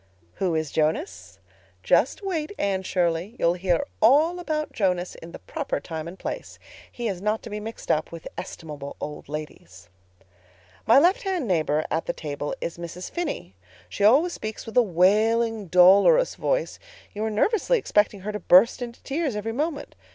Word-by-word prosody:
"Who 180 -4 0
is 155 -2 -2
Jonas? 160 - -2 0.5
Just - - +2
wait, 335 -5 -2
Anne 195 -1 0
Shirley. 180 +2 -1
You'll 170 - +2
hear 180 +6 0 0.2
all 300 +10 +4
about 310 -3 -2
Jonas 180 -4 0
in 165 - -11
the - - -8
proper 300 -4 -4
time 160 -1 -6
and 175 +3 -9
place. - - -6 0.3
He 240 -1 -4
is 190 -4 -3
not 210 +2 -1
to 225 - -9
be 210 - -4
mixed 225 +2 -5
up 155 0 0
with 165 -1 -8
estimable 150 -6 -7
old 150 -1 -7
ladies. 95 - -8 1.0
"My 230 - +7
left 350 +7 +4
hand 370 - -2
neighbor 155 -4 +1
at 160 - -1
the - - 0
table 145 -1 -5
is 170 - -5
Mrs. 170 +1 -7
Phinney. 340 - -4 0.4
She 200 - -3
always 285 +12 +5
speaks 215 0 -6
with 225 - -9
a 250 - +7
wailing, 215 +3 +2
dolorous 195 - +6
voice—you - - -4
are 220 - 0
nervously 430 - +2
expecting 210 - +1
her 210 +3 -4
to 210 - -4
burst 200 +8 +5
into 240 -1 -7
tears 285 -4 -2
every 215 +2 -3
moment. 295 +3 -3
210 Hz, 170 wpm, -25 LUFS, 170-275 Hz, 1.0 s, My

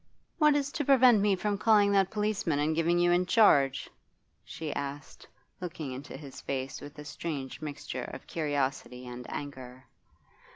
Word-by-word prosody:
'What 300 -2 +5
is 285 -1 0
to 295 - -2
prevent 255 -5 +6
me 200 -1 +3
from 205 +2 -2
calling 210 -3 +4
that 195 -1 +3
policeman 210 -7 -1
and 150 +2 +1
giving 170 +1 +2
you 175 0 +3
in 180 +1 +2
charge?' 140 - +4 0.6
she 155 -2 -6
asked, 140 0 -6 0.3
looking 165 -6 -5
into 135 +1 -7
his 140 -2 -10
face 135 0 -4
with 145 0 -10
a 150 - -9
strange 145 -3 -5
mixture 150 -2 -5
of - - -9
curiosity 135 -5 -2
and 125 0 -8
anger. 130 -2 -7
155 Hz, 160 wpm, -29 LUFS, 140-200 Hz, 0.6 s, prevent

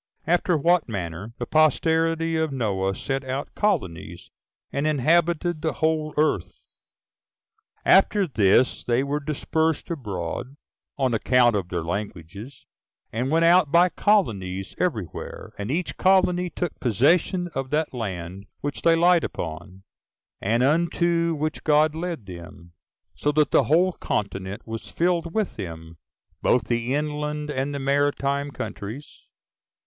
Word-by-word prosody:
After 175 0 +2
What 170 0 +2
Manner 95 +1 -5
The 120 - -3
Posterity 160 +2 +2
Of 160 -1 0
Noah 95 -7 -1
Sent 135 +6 -3
Out 130 +2 -4
Colonies, 95 - -2 0.4
And 140 +2 0
Inhabited 165 +3 +1
The 160 - -1
Whole 155 -1 0
Earth. 150 - 0 1.2
1. - - +6
After 195 0 +4
this 115 - +3
they 120 +2 +1
were 145 +1 -1
dispersed 160 +2 -1
abroad, 120 - -5 0.4
on 130 -3 +1
account 120 0 +3
of 95 -3 -2
their 85 -3 -2
languages, 100 - -6 0.5
and 120 +4 -1
went 165 +2 +3
out 170 -3 +5
by 175 +2 +5
colonies 100 - 0
every 145 - 0
where; - - -9
and 100 +2 -4
each 165 +5 -2
colony 180 -1 +3
took 175 -2 -4
possession 165 - +2
of 135 0 -3
that 150 +1 -1
land 95 -4 -5
which 145 -1 -4
they 165 0 +4
light 175 0 +4
upon, 85 +3 -6 0.6
and 115 +5 +1
unto 170 +2 +2
which 155 +1 -3
God 150 0 +3
led 165 - -4
them; 85 -1 -11 0.4
so 145 - 0
that 150 0 +2
the - - +4
whole 175 +5 +3
continent 100 - -4
was 115 0 -6
filled 170 -1 0
with 215 -3 -1
them, 80 -4 -8 0.4
both 125 - +3
the 120 +2 -1
inland 150 0 -3
and 135 +1 -2
the 140 - -3
maritime 140 0 0
countries. 125 0 -8
140 Hz, 135 wpm, -24 LUFS, 105-165 Hz, 1.2 s, 1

